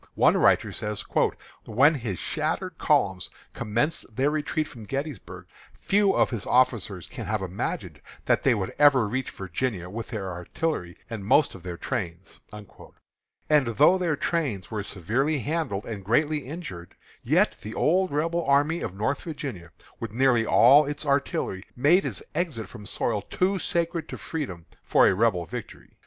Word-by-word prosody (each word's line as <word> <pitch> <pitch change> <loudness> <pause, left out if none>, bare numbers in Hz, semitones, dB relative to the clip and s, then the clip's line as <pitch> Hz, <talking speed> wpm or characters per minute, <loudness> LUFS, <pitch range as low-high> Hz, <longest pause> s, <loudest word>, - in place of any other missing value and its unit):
One - - +4
writer - - +3
says: 105 -1 -4 0.6
"When 135 +8 +4
his 115 - -4
shattered - - -3
columns 95 -2 +1 0.2
commenced 115 +2 -2
their 135 +3 +2
retreat 155 0 -1
from 115 -6 -11
Gettysburg, 140 +5 -5 0.3
few 200 0 +2
of - - +3
his 115 -7 -4
officers 110 -7 +2
can 120 -4 -8
have 105 -2 -1
imagined 95 +1 -4 0.2
that - - +3
they 130 -3 +3
would 95 -3 -3
ever 140 -6 +6
reach 130 +4 -2
Virginia 95 -1 -4
with 115 +2 -5
their 100 -5 -4
artillery 90 - -3
and 110 -3 -6
most 145 +9 +3
of 95 - -11
their 85 0 -6
trains." 85 +2 -5 1.1
And 150 -4 +4
though 150 - +4
their 170 -4 +1
trains 140 - -2
were 105 -2 -2
severely 115 - -1
handled 140 -7 -2
and 105 -4 -6
greatly 145 +6 +1
injured, 115 - -8 0.3
yet - - +2
the 110 - -7
old 185 +4 +2
Rebel 165 +4 0
army 145 +4 +2
of 90 - -4
Northern 140 - -2
Virginia, 100 - -6 0.3
with - - -4
nearly 120 -2 +3
all 145 +1 +6
its 145 +1 -3
artillery, 140 -9 0
made 155 +10 +4
its - - -5
exit 150 -11 -2
from 105 -4 -10
soil 110 -3 -1
too 190 - 0
sacred 170 -1 -1
to - - -6
freedom 95 - -5 0.2
for - - +4
a - - +4
Rebel 95 -4 +1
victory. - - -8
125 Hz, 160 wpm, -26 LUFS, 100-150 Hz, 1.1 s, ever